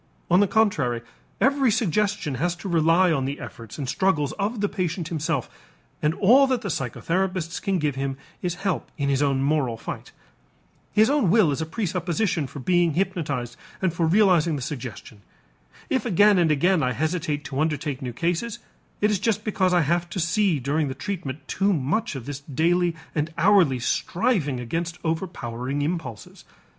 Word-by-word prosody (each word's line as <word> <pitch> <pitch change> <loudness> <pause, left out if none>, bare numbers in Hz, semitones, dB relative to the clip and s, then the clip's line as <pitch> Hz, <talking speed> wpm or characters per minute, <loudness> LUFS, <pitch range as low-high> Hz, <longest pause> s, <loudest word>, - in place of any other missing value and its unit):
On 180 - +6
the 205 - +4
contrary, 150 - +1 0.4
every 275 -1 +3
suggestion 205 - 0
has 175 0 +1
to 195 - -8
rely 170 +1 +4
on 135 -4 0
the 140 +2 -4
efforts 115 -3 -9
and 140 -3 -4
struggles 150 -3 +1
of 210 +3 -1
the 205 - +1
patient 180 -3 -3
himself 160 -5 -1 0.5
and 150 +2 +1
all 255 +7 +6
that 255 -3 0
the 200 - -4
psychotherapists 170 +5 -2
can 195 -1 0
give 150 -3 0
him 135 0 -3 0.2
is 175 -1 -2
help 190 -3 -1
in 140 -2 0
his 135 0 +1
own 135 -2 +1
moral 140 -5 +1
fight. - - -7 0.8
His 215 +1 +4
own 280 - +2
will 195 -5 +4
is 140 - -2
presupposition 180 - -1
for - - -11
being 175 +3 +2
hypnotized 155 -10 -2 0.2
and 185 -3 0
for 165 -1 +1
realizing 175 -4 +4
the 135 - -4
suggestion. 120 -6 -7 0.7
If 260 - 0
again 205 -2 +4
and 170 -2 +3
again 165 +4 +3
I 125 -2 +1
hesitate 155 +1 -2
to 135 -1 -4
undertake 150 -3 -1
new 125 -2 -4
cases, 175 - -2 0.4
it 210 +1 +3
is 205 - +1
just 215 0 0
because 190 -4 +1
I 175 -1 +4
have 170 +3 0
to 175 - -4
see 165 0 +2
during 145 +4 0
the 130 - -4
treatment 145 -3 -5
too 200 +1 +1
much 155 - -1
of 130 -4 -6
this 145 -1 -5
daily 165 +5 +1 0.2
and 155 +1 -1
hourly 175 -6 +4
striving 150 - 0
against 165 +8 -3
overpowering 145 -6 -3
impulses. 150 -8 -5
165 Hz, 170 wpm, -24 LUFS, 140-190 Hz, 0.8 s, On